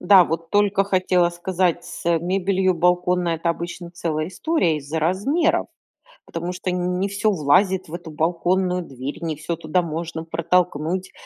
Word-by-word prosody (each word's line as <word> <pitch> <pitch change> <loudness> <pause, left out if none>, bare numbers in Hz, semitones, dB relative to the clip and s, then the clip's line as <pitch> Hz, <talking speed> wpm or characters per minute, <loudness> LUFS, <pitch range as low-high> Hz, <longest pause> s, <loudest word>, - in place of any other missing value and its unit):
Да. 185 0 +7
Вот 165 0 -4
только 205 -1 +3
хотела 185 -2 +2
сказать, 175 0 -1
с, - - -9
э, 170 -1 +3
мебелью 185 +2 +1
балконной 180 0 +2
это 165 +1 0
обычно 170 +1 -6
целая 160 -2 -2
история 190 - 0
из-за 145 +3 -4
размеров, 220 - +1 0.6
потому 170 +2 -4
что 185 0 -3
не 180 +1 -1
всё 205 +2 +1
влазит 185 +3 +2
в - - -11
эту 170 -2 -7
балконную 180 +3 0
дверь, 135 -1 -7
не 160 -2 -2
всё 155 +3 -3
туда 165 +2 0
можно 165 0 -4
протолкнуть. 170 +1 0
175 Hz, 155 wpm, -22 LUFS, 165-185 Hz, 0.6 s, Да